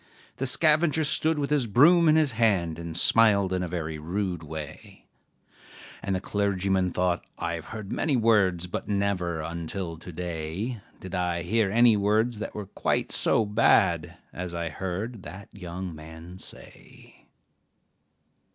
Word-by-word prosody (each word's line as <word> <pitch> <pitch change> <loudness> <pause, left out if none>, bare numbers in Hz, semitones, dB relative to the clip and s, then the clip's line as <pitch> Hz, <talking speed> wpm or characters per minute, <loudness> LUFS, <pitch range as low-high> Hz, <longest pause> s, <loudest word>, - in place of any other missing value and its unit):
The 135 - -1
scavenger 155 +3 +3
stood 155 +1 +1
with 145 0 -2
his 140 -5 +2
broom 160 - +5
in 155 - +5
his 155 -3 +3
hand, 100 -8 +1
And 85 -1 -5
smiled 100 -3 +4
in 90 - 0
a 90 - -2
very 80 -2 -4
rude 90 +2 -3
way; 80 -1 -9 1.0
And 95 - -2
the - - -1
clergyman 95 -2 0
thought, 90 -1 0
'I 85 - -3
have 85 -1 -6
heard 110 -3 -8
many 150 -4 0
words, 105 -7 +2
But 90 - -5
never, 100 -5 -1
until 85 +1 -5
to 85 +2 -10
day, 90 +7 -4 0.2
Did 95 -1 -9
I 90 -2 -1
hear 105 +3 +1
any 115 +2 +5
words 105 +3 +1
that 110 - -6
were 105 - -5
quite 95 - -2
so 110 - +2
bad 100 -6 +2 0.2
As 90 -1 -5
I 85 -1 -3
heard 95 +7 -5
that 95 +3 -10
young 90 -2 -6
man 80 +3 -11
say.' - - -16
95 Hz, 150 wpm, -26 LUFS, 85-110 Hz, 1.0 s, broom